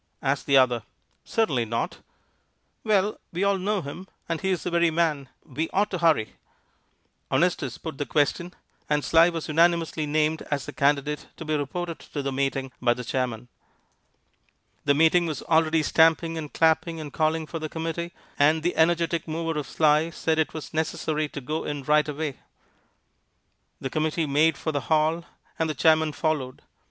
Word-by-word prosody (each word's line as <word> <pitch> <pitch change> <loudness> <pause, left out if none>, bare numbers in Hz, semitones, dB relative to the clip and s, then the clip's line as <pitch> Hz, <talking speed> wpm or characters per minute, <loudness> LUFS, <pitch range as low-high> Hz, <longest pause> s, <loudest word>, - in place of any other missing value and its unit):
asked 140 0 0
the 140 -1 +5
other. 125 -3 +4 0.4
"Certainly 145 - 0
not." 115 +1 -3 0.9
"Well, 210 -1 +1
we 180 +3 -2
all 200 -1 +2
know 200 0 -1
him, 175 +7 -8 0.2
and 165 -1 -2
he 190 - -1
is 185 -3 -1
the 180 - -3
very 170 0 +3
man. 155 -5 0 0.2
We 155 +5 -3
ought 205 +2 +1
to 185 - -2
hurry." 155 - +2 0.9
Honestus 160 -8 0
put 160 -4 -7
the 145 - -2
question, 170 +4 0 0.3
and 150 -1 +1
Sly 165 +1 +5
was 165 -2 -4
unanimously 165 -1 +2
named 155 +1 +1
as 145 -2 -1
the 145 - -8
candidate 145 +1 0
to 165 - -7
be 155 0 0
reported 165 +4 -3
to 145 - -6
the 135 - -2
meeting 135 0 -1
by 120 -1 +3
the 125 - -6
chairman. 125 -1 -2 1.4
The 140 - +4
meeting 165 +3 +4
was 155 - -4
already 160 -1 +2
stamping 165 +1 +3
and 155 -3 -5
clapping 160 0 +2
and 150 -2 -7
calling 160 0 +1
for 165 +1 -6
the 155 0 -4
committee, 165 +2 -4 0.3
and 155 +2 +4
the 175 - 0
energetic 170 0 +2
mover 165 0 -2
of 145 - -5
Sly 155 +1 +3
said 160 -1 -1
that 160 - +3
it - - -22
was 155 - -7
necessary 155 -1 -1
to 140 - -7
go 155 +5 -3
in 145 -2 -4
right 150 +2 +3
away. 150 -1 -4 1.4
The 135 - -5
committee 155 +1 0
made 150 +2 +3
for 160 - -2
the 145 -2 -1
hall, 160 +2 +2 0.3
and 160 -1 +1
the 155 - -2
chairman 160 +3 +3
followed. 150 -5 -2
155 Hz, 175 wpm, -25 LUFS, 145-165 Hz, 1.4 s, the